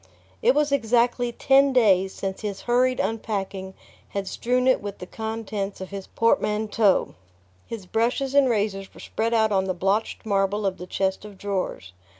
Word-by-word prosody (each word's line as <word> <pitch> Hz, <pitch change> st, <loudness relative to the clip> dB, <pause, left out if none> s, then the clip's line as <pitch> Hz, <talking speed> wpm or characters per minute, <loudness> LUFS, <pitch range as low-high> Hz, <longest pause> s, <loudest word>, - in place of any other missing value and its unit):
It -, -, +4 dB
was 295 Hz, -1 st, +2 dB
exactly 240 Hz, -1 st, +2 dB
ten 270 Hz, +2 st, +4 dB
days 195 Hz, -6 st, +4 dB
since 190 Hz, 0 st, -5 dB
his 205 Hz, -3 st, -4 dB
hurried 250 Hz, +1 st, +2 dB
unpacking 195 Hz, -4 st, -3 dB, 0.3 s
had 200 Hz, -1 st, -4 dB
strewn 250 Hz, +5 st, 0 dB
it 260 Hz, -, +4 dB
with 200 Hz, -1 st, -6 dB
the 180 Hz, -, -8 dB
contents 220 Hz, -1 st, -4 dB
of 190 Hz, 0 st, -7 dB
his 195 Hz, -1 st, -6 dB
portmanteaux. 215 Hz, -2 st, +2 dB, 0.5 s
His 225 Hz, -5 st, -7 dB
brushes 240 Hz, +7 st, 0 dB
and 280 Hz, -2 st, +5 dB
razors 200 Hz, -3 st, -1 dB
were -, -, -13 dB
spread 230 Hz, +1 st, -1 dB
out 220 Hz, -1 st, +3 dB
on 190 Hz, -1 st, +2 dB
the 185 Hz, -1 st, -2 dB
blotched 195 Hz, +6 st, -1 dB
marble 200 Hz, 0 st, +1 dB
of 190 Hz, -1 st, -1 dB
the 180 Hz, -, -7 dB
chest 190 Hz, +1 st, -1 dB
of 210 Hz, -2 st, -11 dB
drawers. 185 Hz, -, -3 dB
210 Hz, 165 wpm, -24 LUFS, 195-235 Hz, 0.5 s, and